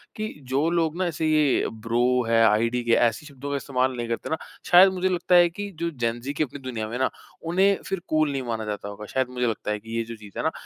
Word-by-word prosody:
कि 215 Hz, 0 st, -4 dB, 0.2 s
जो 145 Hz, +5 st, +2 dB
लोग 165 Hz, -1 st, 0 dB
ना 185 Hz, -, 0 dB
ऐसे 160 Hz, -1 st, -2 dB
ये 155 Hz, -3 st, +3 dB, 0.2 s
ब्रो 115 Hz, +1 st, +1 dB, 0.3 s
है, 115 Hz, 0 st, +4 dB
आईडीके 115 Hz, +2 st, +1 dB, 0.2 s
ऐसी 115 Hz, +6 st, -4 dB
शब्दों 140 Hz, -1 st, -8 dB
का -, -, 0 dB
इस्तेमाल 130 Hz, -1 st, 0 dB
नहीं 120 Hz, -1 st, -3 dB
करते 115 Hz, 0 st, -3 dB
ना, 160 Hz, -, 0 dB, 0.3 s
शायद 185 Hz, +2 st, +8 dB
मुझे 185 Hz, 0 st, 0 dB
लगता 180 Hz, 0 st, +2 dB
है 175 Hz, -1 st, +7 dB
कि 205 Hz, +4 st, -6 dB
जो 170 Hz, -, 0 dB
जेन-ज़ी 120 Hz, -1 st, -3 dB
की 150 Hz, -, +1 dB
अपनी 145 Hz, 0 st, -7 dB
दुनिया 120 Hz, -5 st, -4 dB
में 110 Hz, -, -8 dB
है -, -, -6 dB
ना, -, -, +2 dB, 0.3 s
उन्हें 190 Hz, +4 st, +2 dB
फिर 195 Hz, -, -2 dB
कूल 155 Hz, -1 st, +2 dB
नहीं 135 Hz, -1 st, -2 dB
माना 115 Hz, -2 st, -3 dB
जाता 105 Hz, -1 st, -4 dB
होगा 105 Hz, +1 st, -8 dB
शायद 130 Hz, +4 st, -1 dB
मुझे 125 Hz, -1 st, -1 dB
लगता 110 Hz, -2 st, -2 dB
है, 105 Hz, -, -2 dB
कि 115 Hz, +2 st, -6 dB
ये 115 Hz, -, 0 dB
जो 115 Hz, +1 st, -8 dB
चीज़ 105 Hz, -3 st, -13 dB
है -, -, -2 dB
ना। -, -, +1 dB
130 Hz, 260 wpm, -25 LUFS, 115-165 Hz, 0.3 s, शायद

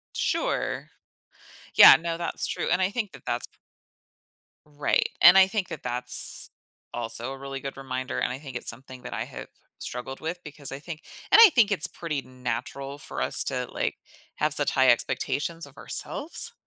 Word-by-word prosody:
Sure. -, -, -1 dB, 0.9 s
Yeah, -, -, +11 dB
no, 165 Hz, 0 st, -4 dB
that's 170 Hz, -, 0 dB
true, -, -, -3 dB
and 180 Hz, +1 st, +2 dB
I 185 Hz, -, +2 dB
think 210 Hz, -4 st, -3 dB
that 135 Hz, -, -13 dB
that's -, -, -2 dB
p -, -, -34 dB, 1.1 s
Right, 145 Hz, -1 st, 0 dB
and 180 Hz, +2 st, +9 dB
I 190 Hz, -, +7 dB
think 195 Hz, -2 st, -2 dB
that 155 Hz, -, -7 dB
that's 125 Hz, 0 st, 0 dB, 0.4 s
also 120 Hz, +2 st, -3 dB
a 135 Hz, -, -9 dB
really 135 Hz, 0 st, -6 dB
good 135 Hz, 0 st, -7 dB
reminder, 130 Hz, -1 st, -4 dB
and -, -, 0 dB
I 130 Hz, -, -4 dB
think 135 Hz, -3 st, -10 dB
it's -, -, -2 dB
something 130 Hz, +1 st, -10 dB
that -, -, -7 dB
I -, -, -2 dB
have -, -, -9 dB, 0.3 s
struggled 125 Hz, +2 st, -6 dB
with, 165 Hz, +3 st, -4 dB
because 145 Hz, -1 st, -4 dB
I 135 Hz, -, -5 dB
think 155 Hz, +1 st, -8 dB, 0.3 s
and 400 Hz, -, +8 dB
I 445 Hz, -, +10 dB
think 220 Hz, -4 st, +5 dB
it's 160 Hz, -6 st, +1 dB
pretty 155 Hz, -5 st, -4 dB
natural 130 Hz, +2 st, -5 dB
for 140 Hz, -, -6 dB
us -, -, 0 dB
to, 125 Hz, -2 st, -2 dB
like, -, -, -2 dB, 0.4 s
have 150 Hz, -1 st, 0 dB
such 145 Hz, -1 st, +2 dB
high 130 Hz, -1 st, +4 dB
expectations 160 Hz, +6 st, 0 dB
of 140 Hz, 0 st, -17 dB
ourselves. 335 Hz, -, 0 dB
140 Hz, 185 wpm, -26 LUFS, 130-170 Hz, 1.1 s, Yeah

